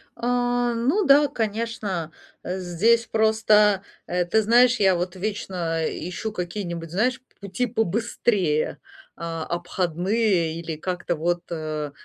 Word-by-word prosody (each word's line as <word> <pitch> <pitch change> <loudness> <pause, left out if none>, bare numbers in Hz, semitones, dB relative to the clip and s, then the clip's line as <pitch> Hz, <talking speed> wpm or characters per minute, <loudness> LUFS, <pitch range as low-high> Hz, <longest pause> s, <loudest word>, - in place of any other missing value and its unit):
А, 245 0 0
ну 275 - +1
да, 285 +1 +6
конечно, 215 - -3 0.3
здесь 190 +6 +1
просто, 215 -2 +3 0.2
э, 180 0 0
ты 220 +5 +2
знаешь, 240 +3 +5
я 190 -2 +4
вот 175 +1 -3
вечно 185 -4 -3
ищу 180 +6 -5
какие-нибудь, 175 -3 -5
знаешь, 250 +8 +1 0.2
пути 200 +5 -2
побыстрее, 215 -6 0 0.4
а, 165 -1 -4
обходные 175 +1 0
или 165 -1 -5
как-то 180 +1 -3
вот, 175 +2 -1
а, 155 -2 -3
190 Hz, 115 wpm, -24 LUFS, 170-230 Hz, 0.4 s, да